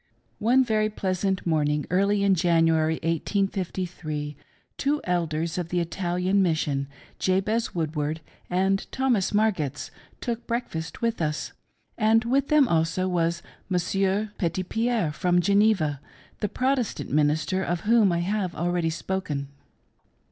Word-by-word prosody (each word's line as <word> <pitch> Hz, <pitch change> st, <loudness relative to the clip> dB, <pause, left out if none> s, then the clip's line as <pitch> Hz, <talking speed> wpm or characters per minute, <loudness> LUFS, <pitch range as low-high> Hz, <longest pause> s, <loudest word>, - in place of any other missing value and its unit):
One 250 Hz, +5 st, +4 dB
very 215 Hz, -2 st, +1 dB
pleasant 190 Hz, -2 st, -1 dB
morning, 150 Hz, -3 st, +1 dB
early 200 Hz, +2 st, +2 dB
in 200 Hz, -1 st, +4 dB
January, 165 Hz, -2 st, +3 dB
1853, 170 Hz, -3 st, -2 dB, 0.4 s
two 290 Hz, +2 st, 0 dB
Elders 165 Hz, -1 st, -1 dB
of 170 Hz, -2 st, -4 dB
the 175 Hz, -, 0 dB
Italian 180 Hz, +2 st, 0 dB
Mission, 150 Hz, -6 st, 0 dB, 0.3 s
Jabez 200 Hz, +5 st, 0 dB
Woodward 155 Hz, -1 st, -2 dB, 0.3 s
and 190 Hz, +2 st, 0 dB
Thomas 250 Hz, -8 st, +1 dB
Margetts, 205 Hz, -10 st, 0 dB, 0.3 s
took 235 Hz, -1 st, -4 dB
breakfast 165 Hz, -8 st, -4 dB
with 230 Hz, -5 st, 0 dB
us; 150 Hz, -1 st, -2 dB, 0.5 s
and 225 Hz, +1 st, +4 dB
with 270 Hz, +3 st, +2 dB
them 300 Hz, -3 st, +5 dB
also 165 Hz, +2 st, +1 dB
was 170 Hz, -1 st, 0 dB, 0.3 s
Mons. 180 Hz, -1 st, -1 dB, 0.5 s
Petitpierre 190 Hz, +2 st, 0 dB
from 180 Hz, +2 st, +2 dB
Geneva, 195 Hz, -7 st, +2 dB, 0.4 s
the 210 Hz, -, -1 dB
Protestant 255 Hz, 0 st, -1 dB
minister 155 Hz, +5 st, +1 dB
of 175 Hz, -2 st, -1 dB
whom 215 Hz, -2 st, +4 dB
I 170 Hz, 0 st, 0 dB
have 190 Hz, -1 st, -1 dB
already 175 Hz, +1 st, 0 dB
spoken. 160 Hz, -5 st, -3 dB
180 Hz, 120 wpm, -26 LUFS, 165-210 Hz, 0.5 s, them